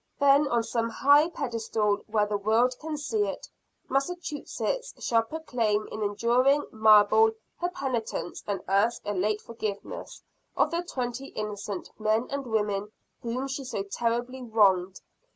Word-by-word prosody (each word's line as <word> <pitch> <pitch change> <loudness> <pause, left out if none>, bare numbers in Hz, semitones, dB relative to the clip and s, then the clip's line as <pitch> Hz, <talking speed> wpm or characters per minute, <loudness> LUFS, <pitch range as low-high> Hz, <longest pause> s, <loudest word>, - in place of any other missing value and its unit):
Then, 285 +1 +5
on 235 -3 +1
some 230 0 -1
high 285 +7 +5
pedestal, 220 -7 -1
where 215 -1 +2
the 210 0 -2
world 220 +5 +2
can 310 -1 -4
see 415 +8 0
it, - - -6 0.4
Massachusetts 350 - -2
shall 230 -1 +2
proclaim 225 -6 -1
in 215 - -5
enduring 240 +7 +2
marble 220 0 +6 0.3
her 350 - 0
penitence 260 -9 -3
and 200 -1 -2
ask 205 +5 +2
a 205 - -1
late 210 +3 0
forgiveness 215 -3 -6 0.3
of - - +3
the 340 +1 0
twenty 260 -5 -4
innocent 205 -4 -5
men 215 +2 +1
and 275 -2 -3
women 210 -2 -1 0.3
whom 245 +3 -3
she 270 +1 -4
so 250 -6 -3
terribly 240 +5 -2
wronged. 195 -6 +2
230 Hz, 140 wpm, -27 LUFS, 210-275 Hz, 0.4 s, marble